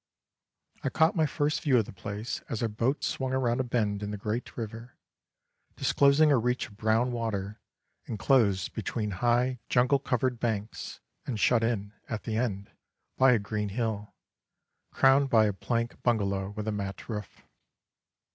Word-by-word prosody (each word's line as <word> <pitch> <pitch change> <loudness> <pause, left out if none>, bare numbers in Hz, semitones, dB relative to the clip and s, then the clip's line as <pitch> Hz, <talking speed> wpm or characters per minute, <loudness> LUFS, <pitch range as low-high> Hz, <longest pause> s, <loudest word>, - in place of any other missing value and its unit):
I - - +1
caught 160 +2 +3
my 160 -3 +3
first 145 +1 0
view 140 -6 +3
of 110 - +2
the - - -10
place 105 +4 -5
as 115 - -2
our - - +2
boat 115 +6 -1
swung 130 -1 -1
round 125 -2 +1
a - - +2
bend 105 -5 -1
in 105 - -3
the 105 - -4
great 110 +4 -4
river, 115 +1 -7 0.8
disclosing 145 +2 +4
a 135 - +5
reach 125 +2 0
of 105 - -17
brown 110 +4 +1
water, 105 -4 -3 0.5
enclosed 105 -4 +2
between 110 0 -3
high, 120 +5 +1
jungle 125 +3 +3
covered 125 -2 -1
banks, 110 -2 -3 0.3
and 115 -5 -2
shut 115 +1 +3
in, 105 -3 -1 0.2
at 110 - -4
the 110 - -3
end, 100 -4 -2 0.4
by 130 -1 +6
a - - +4
green 105 0 -3
hill, 105 -1 -3 0.7
crowned 135 +1 +4
by 110 -3 +5
a 105 - +1
plank 115 +4 -2
bungalow 100 -5 0
with 105 +1 -6
a - - +1
mat 100 -1 -5
roof. 105 -4 -6
115 Hz, 165 wpm, -29 LUFS, 105-125 Hz, 0.8 s, by